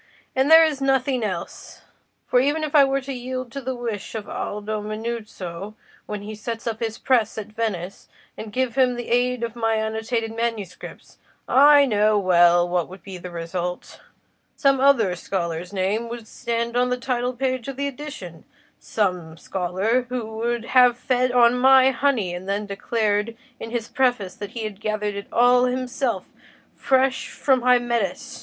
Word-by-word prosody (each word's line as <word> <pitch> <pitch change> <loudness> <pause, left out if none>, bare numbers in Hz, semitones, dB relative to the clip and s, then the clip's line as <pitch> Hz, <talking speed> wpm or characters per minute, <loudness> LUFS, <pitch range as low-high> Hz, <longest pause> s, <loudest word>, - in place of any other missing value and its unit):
And 265 +2 +2
there 325 0 +9
is 295 -3 -2
nothing 265 -2 +1
else. 185 -5 -6 0.4
For 250 - +3
even 290 +4 +1
if 305 - -3
I 290 -2 +7
were 275 0 +1
to 270 +1 -6
yield 255 0 -5
to 275 - -6
the 260 0 -3
wish 230 -4 -5
of 215 -2 -5
Aldo 210 +1 -4
Manuzio 215 -3 -6 0.3
when 210 -1 -5
he 215 +1 -7
sets 225 +2 -6
up 225 -2 -3
his 225 -2 -3
press 230 -5 +1
at 215 0 -6
Venice, 200 -5 -4 0.3
and 215 -1 -8
give 255 +1 -1
him 255 -1 +2
the 240 -1 -6
aid 245 0 +1
of 230 -1 -4
my 225 -1 0
annotated 220 +1 -2
manuscripts, 225 -6 -5 0.3
I 285 +1 +7
know 215 -3 +2
well 175 -2 +4
what 175 -1 -1
would 185 +1 -12
be 190 -2 -8
the 180 - -8
result: 175 +1 -5 0.5
some 275 -2 +3
other 250 -9 +4
scholar's 175 -1 -4
name 205 +4 -1
would 235 -2 -7
stand 235 +1 -3
on 250 0 +2
the 250 - 0
title 250 0 -2
page 255 -1 -2
of 275 - -5
the 280 - -1
edition—some 185 - -5
scholar 190 +9 -1
who 230 -3 -4
would 235 0 -2
have 250 -1 +5
fed 255 0 +1
on 245 0 +4
my 265 0 +6
honey, 245 -8 0
and 180 +2 -7
then 205 +1 -1
declared 210 +2 -1 0.2
in 225 - -6
his 235 -1 -3
preface 245 -9 0
that 205 +1 -8
he 230 - -4
had 210 -1 -6
gathered 215 -1 -2
it 200 0 -7
all 245 +1 +4
himself 250 -4 -2 0.5
fresh 265 0 +1
from 265 -3 +1
Hymettus. 240 0 0
230 Hz, 170 wpm, -23 LUFS, 205-255 Hz, 0.5 s, there